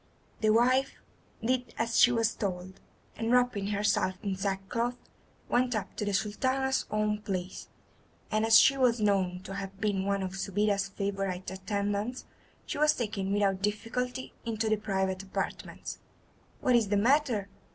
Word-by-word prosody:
'" - - -32
The 215 - +3
wife 255 +5 +3 0.5
did 250 +1 0
as 230 0 +1
she 245 - +7
was 230 -1 +1
told, 185 -2 -4 0.4
and 225 +1 -2
wrapping 245 -5 +2
herself 205 -2 +1
in 195 -2 -1
sackcloth 200 +5 -2 0.5
went 245 0 +1
up 205 -2 -4
to 210 - -1
the 205 - -1
Sultana's 260 +6 0
own 215 0 0
palace, 185 -3 -4 0.6
and 215 0 +2
as 225 0 +8
she 275 - +6
was 245 -3 +3
known 190 -3 +1
to 195 - -7
have 195 0 -6
been 205 -3 0
one 200 -1 0
of 190 0 -4
Subida's 200 +1 0
favourite 195 -2 -3
attendants, 205 +4 -2 0.4
she - - -4
was 300 0 +4
taken 200 -5 -2
without 200 -2 +1
difficulty 245 +5 -2
into 225 -1 -1
the 215 - +3
private 190 -2 -1
apartments. 195 - -5 0.6
"What 250 - +3
is 230 -3 +3
the 205 - +2
matter?" 240 -3 +2
210 Hz, 155 wpm, -30 LUFS, 195-235 Hz, 0.6 s, as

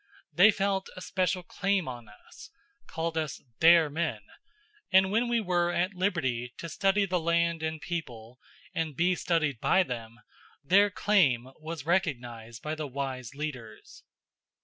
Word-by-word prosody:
They 185 +5 +7
felt 195 -2 0
a 185 - -9
special 185 -1 -1
claim 195 -1 -1
on 120 -3 -7
us 105 - -15 0.4
called 165 0 -2
us 155 -3 -4 0.2
"their 165 -1 +7
men" 160 +4 -2 0.7
and 190 0 +5
when 230 +3 +2
we 235 0 +1
were 175 -4 +1
at 180 +3 0
liberty 130 -11 -1
to 170 - -6
study 195 +4 +2
the 180 -2 0
land 170 0 +1
and 160 0 -3
people, 125 -9 -6 0.3
and 160 -3 -2
be 175 +5 +2
studied 160 -8 0
by 190 +9 +3
them, 115 -5 -7 0.5
their 200 +8 +5
claim 145 - +2
was 155 -2 -7
recognized 120 -10 -2
by 155 - -3
the 155 -1 -4
wise 135 -2 -5
leaders. 130 -8 -7
165 Hz, 150 wpm, -29 LUFS, 130-185 Hz, 0.7 s, They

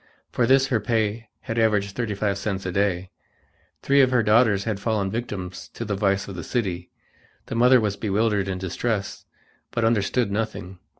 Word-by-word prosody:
For 120 - +1
this 135 0 +5
her 120 - +2
pay 110 -1 -1
had 115 +1 -3
averaged 105 -3 +1
thirty 115 -4 -2
five 100 -1 -1
cents 100 -2 -3
a 90 - -2
day. 95 -1 0 0.7
Three 140 0 +4
of 130 - +4
her 125 -2 +2
daughters 105 -2 +4
had 110 -3 -2
fallen 100 -2 -1
victims 95 -6 -5
to 115 - -4
the 105 - -2
vice 100 -1 0
of 100 - -7
the 85 - -6
city. 90 -5 -2 0.6
The - - -6
mother 125 +2 +5
was 105 -3 -1
bewildered 105 -1 0
and 95 -1 -3
distressed, 100 +2 -3 0.4
but 115 -1 -1
understood 115 0 +1
nothing. 100 -4 -4
105 Hz, 180 wpm, -24 LUFS, 95-115 Hz, 0.7 s, this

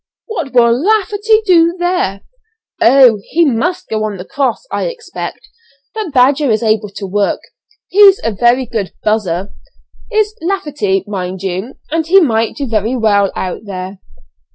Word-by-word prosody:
what 340 - -5
will 235 -2 +4
Lafferty 430 +1 +2
do 340 -3 +4
there?" 350 - -1 0.6
"Oh! 245 -3 +6
he 335 +1 +2
must 300 +7 -1
go 215 -1 -2
on 210 -2 -3
the 180 - -8
cross, 275 - -2
I - - -2
expect, 475 -2 -7 0.5
but 435 -7 -4
Badger 275 +2 +3
is 220 +1 +1
able 215 -1 +1
to 200 - -5
work. 200 +1 -1 0.5
He's 395 0 +6
a 230 - 0
very 240 +5 +2
good 220 -5 -4
'buzzer,' 195 -3 -1 0.6
is 430 -1 +1
Lafferty, 295 - -1
mind 190 -2 -5
you, 190 +7 -4
and 320 0 -1
he 385 +4 +6
might 230 - +1
do 285 - -3
very 225 0 -1
well 205 -4 +2
out 185 +3 -4
there." 190 -1 -7
240 Hz, 155 wpm, -14 LUFS, -, 0.6 s, Oh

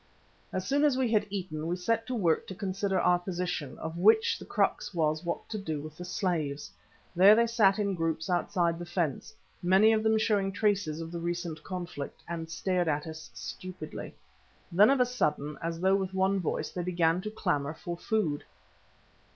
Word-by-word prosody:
As 185 0 -3
soon 285 +8 +2
as 290 -4 +4
we 255 -3 +1
had 215 -2 +2
eaten, 175 -6 -4
we 175 - 0
set 225 +5 -1
to 255 - -2
work 170 -8 +1
to 190 - -7
consider 195 0 -1
our 180 0 +4
position, 175 -5 -3
of 160 +1 -5
which 440 - +4
the - - -9
crux - - 0
was 155 0 +1
what 170 - -3
to 215 - -3
do 160 -6 -3
with 155 +1 -8
the 180 - -8
slaves. 155 -6 -2 0.4
There 195 +4 +8
they 235 +1 +4
sat 220 -4 +3
in 200 -2 0
groups 165 -2 -1
outside 175 -2 +1
the 175 - -5
fence, 170 -6 -2 0.3
many 195 +5 +5
of 215 - +2
them 220 0 +3
showing 205 -3 +1
traces 200 -7 0
of 165 0 -6
the 170 - -4
recent 170 -1 -3
conflict, 175 -6 -6
and 165 -1 -5
stared 180 +1 0
at 150 -1 0
us 160 0 -8
stupidly. 185 -4 -7 0.6
Then 200 +6 +6
of 275 -1 +3
a 250 - +5
sudden, 150 - -1
as 165 0 -3
though 190 +2 +3
with 190 -1 -3
one 190 +1 +2
voice, 175 - -2
they 180 - -3
began 175 -1 +1
to 215 - -4
clamour 145 -8 -1
for 170 +2 -5
food. 175 -6 -1
180 Hz, 190 wpm, -29 LUFS, 165-200 Hz, 0.6 s, There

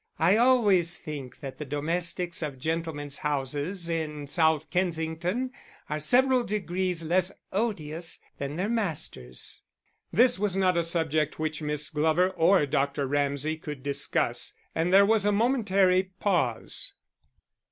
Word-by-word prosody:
I 170 +5 +4
always 210 -8 +4
think 140 -5 -8
that 135 -2 -8
the - - -3
domestics 170 +5 -1
of 145 -4 -4
gentlemen's 155 -1 -3
houses 150 +5 -2
in 155 -3 -3
South 160 0 +2
Kensington 175 +6 -1 0.4
are 150 - -1
several 255 - +4
degrees 185 -4 -1
less 180 +3 +1 0.2
odious 170 -6 -1 0.2
than 140 +1 -4
their 185 +4 -1
masters." 160 - -2 0.5
This 245 -1 +4
was 205 -2 0
not 185 -2 +2
a 170 - +2
subject 160 -3 0
which 155 0 -3
Miss 150 0 -2
Glover 160 +4 +2
or 180 -2 +3
Dr. 140 0 0
Ramsay 145 +2 -1
could 150 -4 -8
discuss, 140 0 -1 0.2
and 165 +2 0
there 195 +1 +7
was 215 0 +3
a 205 - +2
momentary 200 -5 +2
pause. 170 - -1
165 Hz, 130 wpm, -27 LUFS, 150-190 Hz, 0.5 s, there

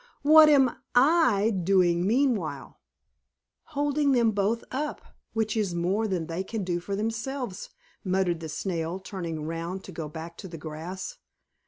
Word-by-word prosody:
What 310 +1 +8
am 270 -4 +4 0.2
I 245 -6 +4
doing 180 -2 +2
meanwhile?" 250 0 0 1.0
"Holding 290 -1 +2
them 235 -3 +4
both 210 +3 0
up, 295 +3 -3 0.3
which 220 0 0
is 200 -6 0
more 190 +6 0
than 180 -5 -1
they 170 +3 -3
can 215 +1 -4
do 175 -1 -1
for 195 +3 -4
themselves," 225 +1 -3 0.3
muttered 185 -3 +1
the 160 -1 -6
Snail, 165 +2 -3
turning 170 -5 -5
round 165 +4 -4
to - - -9
go 155 -2 -5
back 165 +2 -8
to 190 - -8
the 170 -2 -8
grass. 165 - -7
195 Hz, 150 wpm, -27 LUFS, 170-235 Hz, 1.0 s, What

